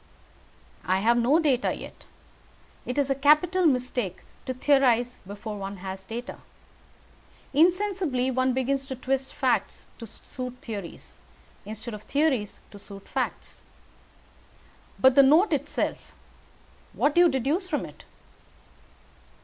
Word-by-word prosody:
"I 185 +3 +1
have 235 +3 +4
no 240 +6 +3
data 285 -7 +1
yet. - - -11 0.8
It 250 - -3
is 280 -1 +1
a - - +5
capital 305 +6 +3
mistake 250 - -1 0.3
to 260 - -1
theorize 250 -3 +2
before 205 +1 -7
one 195 0 -6
has 190 +1 -7
data. 230 +5 -7 1.1
Insensibly 345 -5 +2
one 260 0 +1
begins 265 +1 -1
to 265 - -5
twist 265 +1 -2
facts - - -1
to 230 - -8
suit 250 +3 -8
theories, 205 -8 -8 0.5
instead 220 +2 -7
of 210 - -7
theories 270 -6 -1
to 205 - -11
suit 200 0 -12
facts. - - -4 1.4
But 260 0 +5
the 275 - +7
note 310 +10 +5
itself - - -1 0.9
what 290 - +1
do 345 - +5
you 350 - +6
deduce 285 +8 -1
from - - -2
it?" - - -13
260 Hz, 125 wpm, -26 LUFS, 225-290 Hz, 1.4 s, the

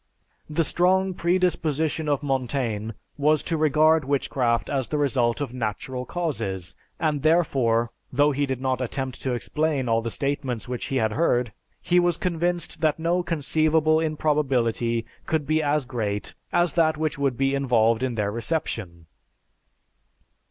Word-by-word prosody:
The 155 +2 +1
strong 185 +3 +2
predisposition 160 -4 0
of 145 0 0
Montaigne 125 -5 -1 0.3
was 150 +2 +3
to 165 - -2
regard 155 +1 +4
witchcraft 130 -3 0
as 135 -3 -1
the 150 - -2
result 130 -4 +1
of 140 -4 -4
natural 125 +2 -4
causes, 100 - -3 0.3
and 150 -3 0
therefore, 130 -8 +2 0.2
though 145 +3 +3
he 140 0 0
did 130 -2 -2
not 130 0 -1
attempt 130 +1 -4
to 130 - -1
explain 145 +2 -1
all 115 0 +2
the 115 - -3
statements 135 -4 -3
which 125 -1 -4
he 135 - -3
had 110 -4 +1
heard, 120 - +1 0.3
he 180 0 +3
was 175 -1 +2
convinced 175 -1 -2
that 155 -2 +2
no 170 +2 +1
conceivable 155 -1 +2
improbability 130 -7 0 0.2
could 155 -2 0
be 155 +2 +1
as 145 -1 +1
great 110 -5 -3 0.2
as 175 -1 +2
that 160 -2 +2
which 155 -2 -2
would 135 -4 0
be 135 0 +1
involved 115 -4 +2
in 130 -2 -1
their 105 -2 -1
reception." 110 - -3
140 Hz, 150 wpm, -25 LUFS, 120-155 Hz, 0.3 s, regard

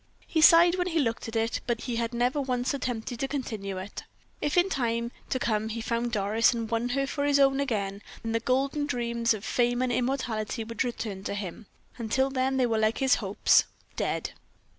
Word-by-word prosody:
He 320 - 0
sighed 340 +3 +7
when 360 - +1
he 335 -2 -1
looked 230 -7 0
at 225 - -7
it, 225 0 0
but 235 -1 -1
he 240 -2 -3
had 230 -1 -1
never 245 +4 +1
once 250 0 -1
attempted 245 -3 -3
to 270 - -1
continue 220 -9 -4
it. 190 +2 -6 0.4
If 295 - 0
in 350 - +7
the 385 - -2
time 235 -2 -1 0.2
to 260 - 0
come 220 -3 0
he 230 +1 -4
found 235 +1 -1
Doris, 220 +3 +2
and 230 -1 -3
won 230 +2 -1
her 275 +2 0
for 285 +1 -3
his 285 0 +3
own 270 0 +4
again, 205 -7 -2 0.2
then 225 - -2
the 230 - +1
golden 275 +5 0
dreams 235 -3 0
of 210 - -8
fame 245 0 +1
and 255 -1 +1
immortality 240 -3 -1
would 230 +1 -2
return 220 -6 -4
to - - -2
him; 200 +1 -6 0.3
until 265 +4 +1
then 265 0 0
they 255 - +3
were 225 -2 +1
like 220 +1 +2
his 265 -2 +3
hopes 200 -1 +4 0.3
dead! - - -2
240 Hz, 210 wpm, -28 LUFS, 225-270 Hz, 0.4 s, sighed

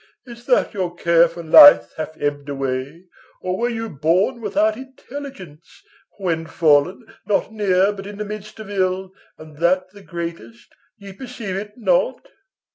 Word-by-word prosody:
Is't 235 -1 -13
that 250 - +2
your 180 -4 -3
care 170 0 +4
for 170 +1 -9
life 290 - +8
hath 155 0 -6
ebbed 145 0 -3
away, 135 +4 -4 0.3
Or 185 0 -3
were 235 +5 -1
you 225 -1 -4
born 180 - 0
without 215 +1 +1
intelligence, 260 - -11 0.3
When 165 -4 -2
fallen, 160 - +2 0.2
not 210 +1 0
near, 195 -2 +2
but 195 -1 -9
in 205 0 -9
the 210 - -4
midst 210 +1 -8
of 215 - -8
ill, 185 -1 -1 0.3
And 155 -1 -14
that 185 +3 +1
the 205 0 -15
greatest, 170 - -8 0.2
ye 200 -2 -11
perceive 230 -4 -7
it 210 +3 -7
not? - - 0
190 Hz, 155 wpm, -20 LUFS, 165-215 Hz, 0.3 s, life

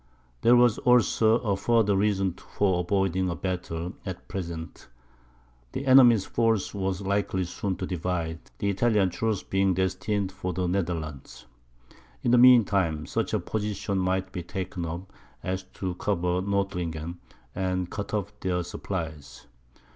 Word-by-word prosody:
There 120 - +6
was 120 -2 +4
also 115 -2 +4
a 105 -4 0
further 110 0 +2
reason 95 -2 +1
for 95 0 -1
avoiding 95 0 +1
a 85 - -2
battle 90 -2 -4
at 95 -3 -7
present; 85 -4 -6 0.9
the 135 - -4
enemy's 125 -6 +7
force 115 -3 +1
was 95 -1 -2
likely 100 -1 0
soon 90 +2 -3
to 95 - -4
divide, 85 -2 -2 0.2
the 100 - -2
Italian 100 -2 +2
troops 110 +1 -1
being 95 -1 +1
destined 95 +2 -1
for 95 -1 -4
the 90 +1 -1
Netherlands. 80 -6 -3 0.8
In 120 - +2
the 125 - +6
mean 125 -3 +8
time, 80 -7 0
such - - -2
a - - +1
position 105 -2 -2
might 95 +1 0
be 90 - -4
taken 95 -1 -5
up, 90 +4 -7 0.3
as 95 +1 -2
to 95 -2 -3
cover 90 -1 0
Nordlingen, 90 -4 -2 0.3
and 90 -1 -2
cut 100 -1 -5
off 105 -1 -2
their 90 -2 -1
supplies. 80 -6 -6
95 Hz, 145 wpm, -27 LUFS, 90-100 Hz, 0.9 s, mean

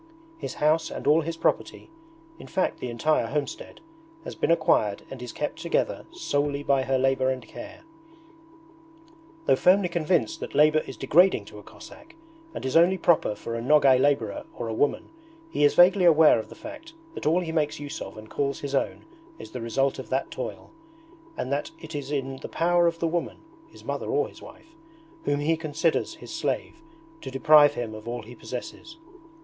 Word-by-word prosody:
His - - -5
house 155 +2 +2
and - - -7
all 155 +3 +5
his 165 +1 -5
property, 330 - -1 0.5
in - - -11
fact 185 - -1
the 125 - -4
entire 120 +1 +1
homestead, 145 +4 -5 0.4
has - - -7
been - - -1
acquired 155 -11 +2
and 135 -2 -8
is 125 - -6
kept 150 +2 -4
together 170 0 -1
solely 145 - -1
by 140 -2 +2
her 130 0 0
labour 130 0 +2
and 130 -4 -4
care. 310 - -10 1.6
Though - - +4
firmly 185 0 +4
convinced 170 -7 0
that - - -7
labour 155 +1 +5
is - - -8
degrading 175 - +4
to 105 - -12
a - - -11
Cossack 290 - -14 0.4
and - - -5
is 130 - -2
only 175 +3 +5
proper 170 - +2
for 115 +2 -6
a 115 - -3
Nogay 135 0 +5
labourer 130 -7 0
or 115 - -4
a 110 - -3
woman, 145 +6 0 0.4
he 150 - 0
is 145 - +4
vaguely 180 +1 +6
aware 160 -6 +6
of 110 - -7
the - - -11
fact 305 +2 -10 0.2
that - - -4
all 170 +4 +3
he 165 -2 -4
makes 155 -3 -1
use 145 -1 -6
of - - -8
and 110 0 -10
calls 140 +3 -2
his 140 -1 -5
own 135 - -1 0.3
is - - -11
the 125 - -6
result 135 +4 0
of - - -8
that - - -1
toil, - - -6 0.7
and 130 - -3
that 140 +1 -1
it 160 0 -10
is 145 -2 -5
in 135 -2 -2
the - - -8
power 175 0 +2
of 165 0 0
the 165 - -1
woman 170 +1 -2 0.3
(his - - -16
mother - - -4
or 430 +1 +1
his - - -16
wife) 325 - -15 0.5
whom 145 - +1
he 160 +3 +2
considers 160 - -1
his 330 - -10
slave, 330 0 -3 0.4
to - - -6
deprive 145 +2 +6
him 115 -3 -4
of 110 +1 -10
all 120 0 -4
he 120 +3 -11
possesses. 125 - -8
150 Hz, 195 wpm, -26 LUFS, 130-170 Hz, 1.6 s, vaguely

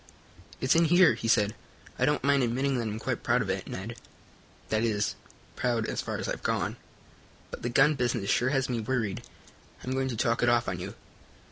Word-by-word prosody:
"It's 130 - +3
in 165 +1 +4
here," 175 -2 +6
he 115 0 -4
said. 105 -2 +3 0.5
"I 125 - +4
don't 150 +2 +1
mind 140 0 +3
admitting 130 +3 0
that 115 - -2
I'm 105 0 -3
quite 110 - -3
proud - - +2
of - - -2
it, - - -4
Ned; 110 +5 -6 0.7
that 110 +1 +1
is, 105 -3 0 0.4
proud 120 -3 0
as - - -2
far - - -4
as - - -4
I've - - -3
gone. - - -1 0.7
But - - -7
the 120 - -2
gun 135 +5 +5
business 120 -6 -1
sure 120 - +2
has 135 -1 +1
me 120 -2 -1
worried. 110 -3 -2 0.6
I'm 130 - -4
going 130 0 0
to 120 -3 -3
talk 115 +2 +1
it 120 - +4
off 120 0 +2
on 90 -2 -2
you. 95 +3 -6
120 Hz, 210 wpm, -28 LUFS, 110-130 Hz, 0.7 s, here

